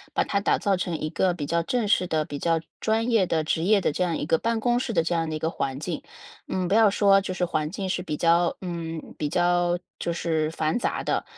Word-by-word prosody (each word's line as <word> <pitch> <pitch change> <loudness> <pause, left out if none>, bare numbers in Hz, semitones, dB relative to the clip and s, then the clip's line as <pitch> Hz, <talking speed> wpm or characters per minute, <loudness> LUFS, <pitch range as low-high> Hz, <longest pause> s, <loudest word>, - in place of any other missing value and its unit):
把 - - +3
它 200 - 0
打 200 - +2
造 200 -1 +1
成 175 -2 -2
一 155 - -3
个 185 -2 +1
比 150 -4 -4
较 170 +3 +1
正 230 +4 -1
式 185 -2 +2
的、 155 -2 0
比 145 -1 -6
较 165 -1 +1 0.2
专 225 +2 0
业 205 -5 +3
的、 160 -2 0
职 160 +1 0
业 205 +3 +4
的 180 - 0
这 180 - -1
样 170 -3 0
一 - - -3
个 160 +1 +2
办 230 +2 0
公 240 +1 +2
室 250 - -3
的， 165 - +2
这 170 - -1
样 165 -1 0
的 155 - -3
一 - - -3
个 160 +1 -1
环 135 -3 -3
境？ 165 0 -4 0.5
嗯， 185 -1 -1
不 195 - 0
要 220 -1 +6
说 195 0 +4
就 190 - -4
是 180 - 0
环 155 -3 -1
境 190 +2 -4
是 180 - -1
比 150 -5 -4
较 170 +1 +3
嗯， 165 -3 -5
比 150 -1 -1
较 175 0 +2 0.2
就 170 - -2
是 160 -2 0
繁 160 +6 -1
杂 - - -2
的， - - 0
175 Hz, 285 characters per minute, -25 LUFS, 160-195 Hz, 0.5 s, 要